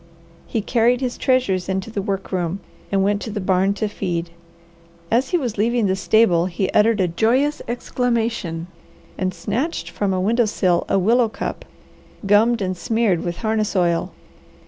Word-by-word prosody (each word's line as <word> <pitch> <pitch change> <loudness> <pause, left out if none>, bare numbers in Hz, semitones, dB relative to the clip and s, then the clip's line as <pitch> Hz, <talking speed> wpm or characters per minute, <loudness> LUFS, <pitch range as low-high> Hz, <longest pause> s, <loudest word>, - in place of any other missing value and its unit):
He 220 - -2
carried 240 +2 +2
his 255 -2 -2
treasures 225 -9 +1
into 190 +3 -2
the 205 - -2
work 195 -1 -3
room, 180 0 -1 0.3
and 195 -1 +2
went 205 +1 +1
to - - -5
the 210 0 -4
barn 190 +1 +1
to 215 +1 -1
feed. 175 -4 -3 0.8
As 250 +4 +2
he 355 - +2
was 245 -9 -3
leaving 235 +1 +2
the 190 -1 +1
stable 185 -3 +3
he 185 +1 -2
uttered 215 0 +3
a 185 - +3
joyous 245 - +1
exclamation 230 -8 -2 0.5
and 185 -1 -1
snatched 215 - -3
from 205 -2 -1
a 185 - 0
window 230 +5 +2
sill 185 -4 +1
a - - +3
willow 230 +5 +3
cup, - - -5 0.6
gummed 215 +2 +3
and 185 0 -2
smeared 220 -3 0
with 175 -1 -3
harness 215 -1 0
oil. 170 -2 +1
205 Hz, 170 wpm, -21 LUFS, 185-230 Hz, 0.8 s, stable